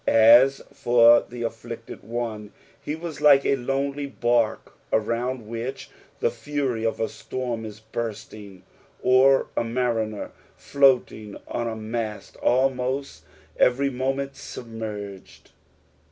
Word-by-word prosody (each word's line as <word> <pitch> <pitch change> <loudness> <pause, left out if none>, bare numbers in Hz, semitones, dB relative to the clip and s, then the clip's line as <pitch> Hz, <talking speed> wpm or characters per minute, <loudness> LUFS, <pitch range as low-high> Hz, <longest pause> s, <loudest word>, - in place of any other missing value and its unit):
As 120 +5 +6
for 120 -1 +5
the 120 0 -6
afflicted 115 0 -7
one 110 -2 -5 0.3
he 150 - -4
was 165 -1 -7
like 140 -2 +6
a - - +3
lonely 140 +2 -2
bark 120 -4 0 0.2
around 115 +2 -1
which 115 +4 -6 0.3
the - - +2
fury 140 -6 -3
of 115 - -1
a 110 - 0
storm 120 -3 -5
is 105 0 -9
bursting, 110 -4 -7 0.4
or 130 +2 +5
a - - +1
mariner 115 -3 -2 0.2
floating 125 -6 +1
on 120 - -3
a 115 - -3
mast, 110 -1 -5
almost 130 +1 0 0.3
every 135 +3 +3
moment 135 +2 -2
submerged. 105 -4 -8
120 Hz, 115 wpm, -24 LUFS, 110-135 Hz, 0.4 s, As